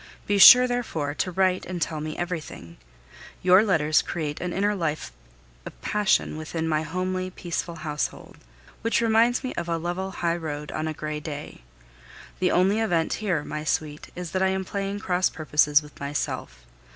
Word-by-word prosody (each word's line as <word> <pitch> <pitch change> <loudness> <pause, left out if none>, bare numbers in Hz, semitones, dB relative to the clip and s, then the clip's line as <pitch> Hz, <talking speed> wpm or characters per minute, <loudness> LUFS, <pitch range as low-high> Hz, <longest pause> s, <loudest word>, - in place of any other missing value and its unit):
Be 205 0 +1
sure, 250 +5 +11
therefore, 195 -13 -2
to 155 - -2
write 185 0 +1
and 185 -1 -4
tell 160 -2 -2
me 155 0 -5
everything. 160 - -6 0.7
Your 185 +3 +6
letters 160 -7 +3
create 150 -3 -4
an 180 - -3
inner 205 +3 +1
life 155 - -3 0.5
of - - -10
passion 205 -6 +1
within 160 +1 -4
my 155 -1 +1
homely, 185 +3 -3
peaceful 170 -1 -4
household, 150 -2 -5 0.4
which 230 +1 +1
reminds 230 +1 +3
me 255 - -3
of 170 0 -4
a 165 - 0
level 175 +3 -3
highroad 160 -5 -3
on 155 0 -3
a 155 - -2
gray 150 0 -4
day. 150 - -7 0.8
The 185 - +2
only 190 +5 +3
event 175 -8 +1
here, 180 -8 0
my 150 0 -5
sweet, 150 -1 -2
is 180 -2 -6
that 185 - -1
I 190 - +4
am 190 0 -1
playing 200 +1 -3
cross 180 -1 +1
purposes 150 -1 +2
with 150 - -15
myself. 140 - -4
170 Hz, 170 wpm, -25 LUFS, 155-190 Hz, 0.8 s, sure